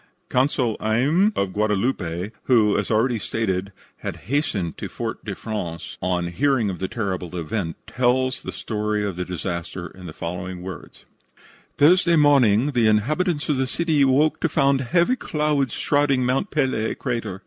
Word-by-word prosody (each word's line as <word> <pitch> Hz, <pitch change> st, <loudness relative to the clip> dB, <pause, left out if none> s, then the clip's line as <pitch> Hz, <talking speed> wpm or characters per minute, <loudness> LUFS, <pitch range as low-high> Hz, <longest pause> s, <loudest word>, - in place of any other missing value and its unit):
Consul 125 Hz, -3 st, +1 dB
Ayme, 140 Hz, -, +2 dB
of 100 Hz, -1 st, 0 dB
Guadeloupe, 105 Hz, -3 st, -1 dB
who, 110 Hz, -5 st, +4 dB
as 105 Hz, -, -1 dB
already 115 Hz, +2 st, +2 dB
stated, 100 Hz, -3 st, -2 dB, 0.3 s
had -, -, -5 dB, 0.2 s
hastened 105 Hz, -, 0 dB
to -, -, -5 dB
Fort -, -, -5 dB
de -, -, -5 dB
France 85 Hz, -7 st, -5 dB
on 90 Hz, -1 st, 0 dB
hearing 130 Hz, -1 st, +1 dB
of 90 Hz, -, -7 dB
the 95 Hz, -, -2 dB
terrible 95 Hz, -5 st, -3 dB
event, 85 Hz, 0 st, -3 dB
tells 130 Hz, +1 st, +1 dB
the -, -, -6 dB
story 105 Hz, -1 st, -2 dB
of 100 Hz, -3 st, -3 dB
the 90 Hz, +1 st, -3 dB
disaster 85 Hz, 0 st, -4 dB
in 90 Hz, +2 st, -10 dB
the -, -, -6 dB
following 90 Hz, +2 st, -5 dB
words: 95 Hz, -2 st, -9 dB, 0.7 s
"Thursday 170 Hz, +3 st, +5 dB
morning 140 Hz, -4 st, +4 dB
the 120 Hz, -4 st, +3 dB
inhabitants 150 Hz, -, +1 dB
of 150 Hz, -, +1 dB
the 130 Hz, 0 st, 0 dB
city 160 Hz, +1 st, +1 dB
awoke 140 Hz, +3 st, +3 dB
to 165 Hz, -, 0 dB
find 140 Hz, -2 st, +2 dB
heavy 170 Hz, -, +2 dB
clouds 150 Hz, -, 0 dB
shrouding 140 Hz, -3 st, +2 dB
Mont 135 Hz, +10 st, 0 dB
Pelee 130 Hz, -7 st, 0 dB
crater. 115 Hz, -7 st, -3 dB
115 Hz, 160 wpm, -23 LUFS, 95-140 Hz, 0.7 s, Thursday